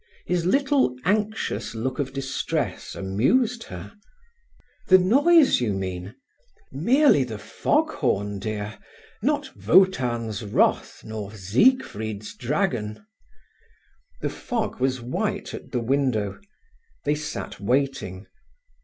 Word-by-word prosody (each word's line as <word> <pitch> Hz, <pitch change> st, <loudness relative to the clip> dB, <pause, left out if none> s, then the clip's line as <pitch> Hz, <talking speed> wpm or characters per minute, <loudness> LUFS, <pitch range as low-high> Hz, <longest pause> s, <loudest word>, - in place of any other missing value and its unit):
His 175 Hz, -1 st, 0 dB
little 270 Hz, -, +2 dB
anxious 210 Hz, -, -1 dB
look 130 Hz, +5 st, -3 dB
of 135 Hz, -2 st, -1 dB
distress 135 Hz, 0 st, -3 dB
amused 220 Hz, -, +1 dB
her. 90 Hz, +3 st, -9 dB, 0.9 s
"The 185 Hz, -, +8 dB
noise, 275 Hz, -, +5 dB
you 110 Hz, -4 st, +1 dB
mean? 95 Hz, +2 st, -4 dB, 0.6 s
Merely 235 Hz, -, +4 dB
the 115 Hz, -4 st, -6 dB
fog 300 Hz, -, 0 dB
horn, 105 Hz, -, -1 dB
dear—not 105 Hz, 0 st, -4 dB
Wotan's 120 Hz, -, +3 dB
wrath, 105 Hz, -, +1 dB
nor 110 Hz, -2 st, -6 dB
Siegfried's 110 Hz, -, +1 dB
dragon…." 125 Hz, -, -2 dB, 1.2 s
The -, -, -1 dB
fog 230 Hz, -, -3 dB
was 130 Hz, -1 st, 0 dB
white 120 Hz, +2 st, -3 dB
at -, -, -9 dB
the 125 Hz, -, 0 dB
window. 120 Hz, -5 st, 0 dB, 0.7 s
They 145 Hz, -, +3 dB
sat 150 Hz, 0 st, -5 dB
waiting. 105 Hz, -5 st, -1 dB
130 Hz, 100 wpm, -24 LUFS, -, 1.2 s, The